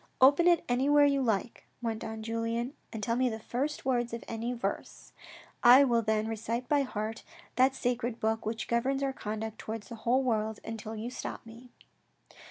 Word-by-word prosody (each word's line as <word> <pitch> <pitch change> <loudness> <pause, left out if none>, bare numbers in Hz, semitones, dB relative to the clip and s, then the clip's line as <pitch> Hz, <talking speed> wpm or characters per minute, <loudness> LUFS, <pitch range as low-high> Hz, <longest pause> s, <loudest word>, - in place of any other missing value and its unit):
" - - -40
Open 335 +5 +1
it 345 -2 +4
anywhere 285 +4 +4
you 280 -1 +2
like," 225 -2 -1
went 225 -2 -3
on 220 0 -6
Julien 230 +3 -2 0.2
and 220 -2 -6
tell 230 +3 +1
me 255 +1 +2
the 220 - -4
first 265 +7 -3
word 240 -2 +1
of 230 - -8
any 230 +2 -3
verse, 245 0 -5 0.2
" - - -23
I 250 +3 +9
will 240 -4 +3
then 220 0 0
recite 225 +2 -3
by 290 -1 +3
heart 220 -4 -3 0.3
that 260 +1 +4
sacred 245 -2 -1
book 220 +1 0
which 220 +1 -3
governs 265 +4 0
our 270 -1 0
conduct 220 -1 -5
towards 220 -2 -6
the 235 - -6
whole 255 +3 +2
world, 220 -3 0
until 225 -1 -6
you 225 +3 -5
stop - - -6
me." 230 +2 -13
235 Hz, 190 wpm, -30 LUFS, 220-255 Hz, 0.3 s, I